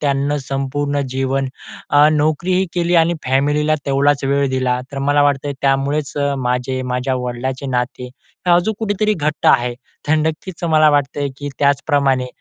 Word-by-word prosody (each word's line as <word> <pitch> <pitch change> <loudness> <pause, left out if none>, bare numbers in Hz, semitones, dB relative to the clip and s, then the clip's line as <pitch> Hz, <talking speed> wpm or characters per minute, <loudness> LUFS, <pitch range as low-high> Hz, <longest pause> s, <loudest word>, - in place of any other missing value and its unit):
त्यांना 140 0 0
संपूर्ण 140 +1 -2
जीवन, 135 0 -1 0.4
अ, 145 +1 +6
नोकरीही 170 +5 +1
केली 175 0 +1
आणि 170 +1 0
फॅमिलीला 145 +4 +1
तेवढाच 140 0 +2
वेळ 140 0 +1
दिला. 125 -1 0
तर 140 - -4
मला 145 0 +4
वाटत 145 -1 +1
आहे 140 - -3
त्यामुळेच 140 +2 0
अ, 140 -1 0
माझे, 125 +1 -1
माझ्या 125 +1 -2
वडिलांचे 130 +2 -4
नाते 125 +1 -3 0.5
अजून 205 +5 0
कुठेतरी 215 -1 0
घट्ट 150 -1 -2
आहे. 120 -2 +3 0.3
तर 155 - +4
नक्कीच 160 +3 -3
मला 155 -2 +4
वाटत 145 -2 0
आहे, 145 - -1
की 145 0 -6
त्याचप्रमाणे 140 -2 +2
140 Hz, 155 wpm, -18 LUFS, 135-150 Hz, 0.5 s, अ